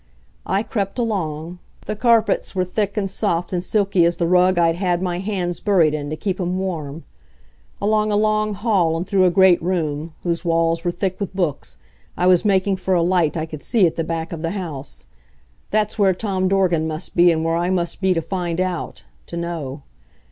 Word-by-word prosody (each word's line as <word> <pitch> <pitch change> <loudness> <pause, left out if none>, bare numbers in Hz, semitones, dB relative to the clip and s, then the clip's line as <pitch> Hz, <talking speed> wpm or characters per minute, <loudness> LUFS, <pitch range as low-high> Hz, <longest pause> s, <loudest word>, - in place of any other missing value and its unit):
I 195 +3 +1
crept 200 -3 -3
along 175 -7 -3 0.3
the 215 - -3
carpets 225 -2 +2
were 185 -1 +1
thick 200 +3 -2
and 200 -2 0
soft 180 -3 -1
and 175 -1 -1
silky 195 -2 +2
as 170 +1 +2
the 170 - 0
rug 180 +1 +3
I'd 165 -1 +3
had 180 -2 0
my 180 -1 -2
hands 185 -3 -2
buried 175 -7 +3
in 145 -1 -3
to 155 - -3
keep 185 +4 -3
'em 180 +1 -1
warm. 165 -5 -4 0.8
Along 215 +1 +1
a - - +2
long 215 0 +1
hall 190 -6 +1
and 170 - -3
through 190 -1 +3
a - - +5
great 185 0 +5
room, 160 -3 -2
whose 170 0 -1
walls 165 -1 +1
were 175 - 0
thick 185 +1 -2
with 200 -2 -4
books, 150 - -2 0.4
I 180 - +1
was 180 -1 +5
making 195 -1 +2
for 190 0 0
a 170 - +3
light 175 -2 +1
I 160 - -1
could 155 -2 -9
see 225 -6 +3
at 165 - 0
the 165 - -1
back 165 0 -4
of 160 - -6
the 165 - -1
house. 140 - -6 0.6
That's 215 0 0
where 195 -2 +4
Tom 190 -2 -1
Dorgan 180 -4 +2
must 155 +2 -6
be 175 0 +6
and 160 -1 -1
where 165 0 +1
I 175 +1 0
must 180 0 -1
be 190 -1 +2
to 165 - -1
find 175 -2 -3
out 185 -2 -3 0.2
to 170 - -6
know. 160 -5 -5
180 Hz, 205 wpm, -21 LUFS, 165-195 Hz, 0.8 s, be